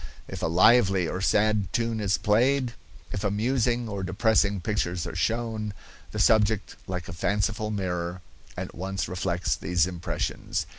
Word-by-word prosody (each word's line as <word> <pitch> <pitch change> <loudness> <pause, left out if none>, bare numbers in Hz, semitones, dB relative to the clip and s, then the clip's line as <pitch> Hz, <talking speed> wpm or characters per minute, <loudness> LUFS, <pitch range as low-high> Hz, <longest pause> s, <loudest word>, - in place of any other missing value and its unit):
If - - -6
a - - +1
lively 95 0 +5
or 90 - -3
sad 105 -1 +2
tune 115 -1 0
is 100 -2 +1
played, 125 +4 +2 0.4
if 100 - -3
amusing 120 +3 +1
or 100 -2 -4
depressing 100 +1 +2
pictures 90 -2 -1
are 85 -2 -6
shown, 110 +1 -1 0.3
the - - -7
subject, 110 -2 +3
like 90 -2 -4
a - - -6
faithful 105 +4 0
mirror, 90 -3 -3 0.4
at - - -5
once 95 +2 -3
reflects 90 -1 -1
these 90 -1 +1
impressions. 90 -2 -3
100 Hz, 145 wpm, -27 LUFS, 90-110 Hz, 0.4 s, lively